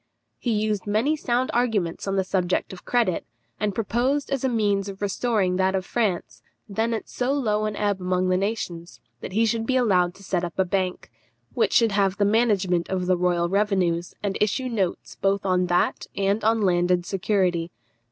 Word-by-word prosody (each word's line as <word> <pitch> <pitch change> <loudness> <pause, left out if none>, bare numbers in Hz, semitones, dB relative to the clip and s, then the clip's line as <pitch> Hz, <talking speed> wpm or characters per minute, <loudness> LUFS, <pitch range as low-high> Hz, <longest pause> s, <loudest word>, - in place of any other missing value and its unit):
He 245 - -2
used 210 -2 -1
many 225 +9 +2
sound 255 -3 0
arguments 220 -9 0
on 195 - 0
the 190 - +2
subject 185 0 -1
of 185 - -12
credit, 235 -8 +1 0.4
and 205 -2 -1
proposed 250 +7 0
as 270 -2 -1
a 265 - +2
means 205 -4 +1
of 195 0 -8
restoring 205 -2 0
that 190 0 +2
of 190 -1 -2
France, 205 -7 -2 0.3
then 220 +3 -1
at 220 - -6
so 250 +2 -1
low 215 -6 0
an 215 -1 -2
ebb 205 -2 -1
among 180 0 0
the 185 - +3
nations, 185 -4 -3 0.2
that 185 - -7
he 225 +3 +3
should 225 0 -1
be 260 - +1
allowed 185 -8 +2
to 200 - -15
set 180 -2 -1
up 175 -2 -5
a 190 - +3
bank, 185 -4 -2 0.4
which 235 - +1
should 230 -2 +4
have 195 -1 +1
the 205 - +2
management 200 -5 +2
of 185 -1 -1
the 185 0 +3
royal 175 -1 +1
revenues, 185 -3 0
and 200 -1 -2
issue 250 +5 +1
notes 195 -7 -2
both 195 0 0
on 180 -1 +2
that 175 0 +1
and 200 +2 +1
on 225 +1 +3
landed 175 -2 +2
security. 180 -3 0
200 Hz, 190 wpm, -24 LUFS, 185-225 Hz, 0.4 s, should